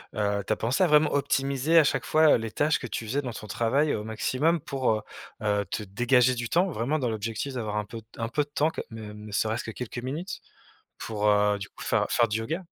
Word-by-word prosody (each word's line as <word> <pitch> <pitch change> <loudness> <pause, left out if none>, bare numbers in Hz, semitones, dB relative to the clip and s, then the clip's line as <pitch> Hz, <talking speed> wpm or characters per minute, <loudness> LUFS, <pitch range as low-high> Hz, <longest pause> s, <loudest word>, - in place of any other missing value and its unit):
heu, 100 -1 0
tu - - +1
as - - -1
pensé 125 - +1
à - - +5
vraiment 150 0 +4
optimiser 140 +3 +2
à 155 - +6
chaque - - 0
fois, 155 -1 +5
heu, - - +3
les 115 -1 -5
tâches 150 +6 +2
que - - -8
tu 115 -1 -4
faisais 140 +6 -1
dans 120 -3 -4
ton 110 - -8
travail 135 +8 +1
au 105 - -4
maximum 130 +9 0
pour, 135 -3 -1
heu 110 - -2 0.4
heu, 105 -1 +1
te - - -2
dégager 120 +5 +3
du 120 -1 -4
temps 180 +4 +3
vraiment 145 +2 -1
dans 125 -3 0
l'objectif 115 +5 -3
d'avoir 110 -4 -3
un 105 - -1
peu 115 +2 -8
t 110 +2 -19
un 115 0 -2
peu 150 +4 +1
de 145 - -16
temps 150 +2 +1
que - - -5
même 105 -1 -8
ne 105 - -9
serait-ce 110 +2 0
que 115 - -5
quelques 125 +1 -7
minutes 160 +9 -5 0.6
pour, 105 -1 -2
heu, 105 0 +3
du 100 0 -7
coup - - -15
faire - - +1
faire 120 - +3
du 110 +1 -1
yoga? 160 +11 -3
120 Hz, 255 wpm, -27 LUFS, 110-145 Hz, 0.6 s, à